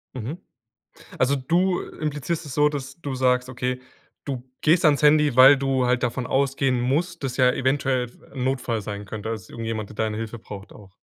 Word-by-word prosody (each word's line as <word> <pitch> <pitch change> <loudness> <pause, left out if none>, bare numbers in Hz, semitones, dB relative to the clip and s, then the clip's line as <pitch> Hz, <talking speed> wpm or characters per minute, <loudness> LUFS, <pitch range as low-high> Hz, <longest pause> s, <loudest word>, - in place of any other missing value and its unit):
Mhm. 130 +8 -5 0.8
Also 130 +2 +3
du 175 +7 +1
implizierst 155 +2 -4
es 130 - -7
so, 150 0 +4
dass 140 +1 -6
du 140 -2 -3
sagst 125 0 +2
okay, 125 0 -3 0.4
du 130 -2 -5
gehst 165 +3 +3
ans 150 -1 +4
Handy, 150 -2 +5
weil 135 +2 +9
du 135 -1 0
halt 125 0 +1
davon 125 +1 -2
ausgehen 135 -2 +1
musst, 155 +5 -1
dass 125 -2 -3
ja 125 -1 +5
eventuell 130 -1 0
f 120 - -13 0.2
'n 130 -2 -4
Notfall 130 -4 -1
sein 105 0 -6
könnte, 110 +2 -6
dass 110 -5 -6
irgendjemand, 115 -2 -4
der 110 - -12
deine 110 -1 -1
Hilfe 115 +1 -5
braucht 100 -2 -10
auch. 95 -3 -15
130 Hz, 190 wpm, -24 LUFS, 120-145 Hz, 0.8 s, weil